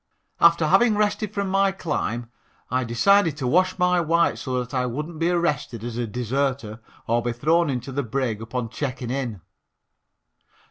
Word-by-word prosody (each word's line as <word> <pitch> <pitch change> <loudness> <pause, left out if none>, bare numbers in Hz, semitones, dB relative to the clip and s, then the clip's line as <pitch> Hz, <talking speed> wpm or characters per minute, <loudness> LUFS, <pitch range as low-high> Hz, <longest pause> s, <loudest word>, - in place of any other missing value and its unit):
After 170 -1 +5
having 210 +7 +4
rested 210 0 0
from 200 -1 -2
my 195 0 +3
climb, 120 - -3 0.4
I 130 0 +1
decided 160 - +3
to 135 - -3
wash 185 +9 +2
my 180 0 +3
Whites 170 +1 +1
so 130 -2 -2
that 125 0 -4
I 125 -1 0
wouldn't 150 +6 -5
be 165 +1 +2
arrested 150 -10 -1
as 120 -1 -5
a 120 -1 -2
deserter 125 -1 -2 0.3
or 115 +1 +1
be 120 0 -2
thrown 160 +7 +2
into 125 0 -3
the 140 +2 -1
brig 120 -3 -2
upon 115 +1 -4
checking 130 -1 -4
in. 125 -8 -3
135 Hz, 170 wpm, -24 LUFS, 120-170 Hz, 0.4 s, After